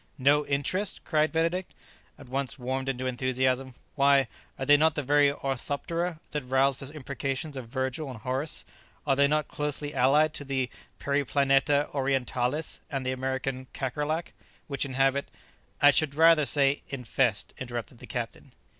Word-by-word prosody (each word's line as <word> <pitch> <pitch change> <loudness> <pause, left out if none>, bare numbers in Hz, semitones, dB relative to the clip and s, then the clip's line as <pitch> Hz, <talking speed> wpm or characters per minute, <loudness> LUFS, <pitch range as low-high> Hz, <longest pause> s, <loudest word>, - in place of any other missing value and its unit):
"No 145 +2 +3
interest?" 165 +8 -1
cried 155 -1 +2
Benedict, 170 +3 -1 0.4
at 140 - -13
once 135 0 -3
warmed 130 +1 -2
into 130 -1 -2
enthusiasm; 130 0 0 0.2
"why, 140 -2 +4 0.3
are 135 - -3
they 145 - +7
not 155 +1 +3
the 145 - -1
very 145 +1 +4
orthoptera 150 +5 -3
that 150 - -2
roused 135 +1 +2
the 135 +1 -6
imprecations 140 0 -4
of 130 -3 -6
Virgil 130 +3 -3
and 120 -5 -8
Horace? 130 +5 -2 0.4
Are 135 -2 +3
they 140 +1 +5
not 150 0 +1
closely 150 0 -2
allied 145 +4 +4
to - - -4
the 130 -3 -2 0.3
Periplaneta 140 0 +2
orientalis 135 +1 -1
and 135 -3 -3
the 130 - 0
American 130 0 -3
Kakerlac, 150 +5 -2 0.3
which 140 -1 -1
inhabit 135 +1 +1 0.3
" - - -33
"I 145 - +9
should 145 -1 +2
rather 160 -1 +6
say 140 +1 +3
infest," 125 -4 -1
interrupted 120 -1 -6
the - - -11
captain. - - -6
140 Hz, 155 wpm, -28 LUFS, 130-145 Hz, 0.4 s, I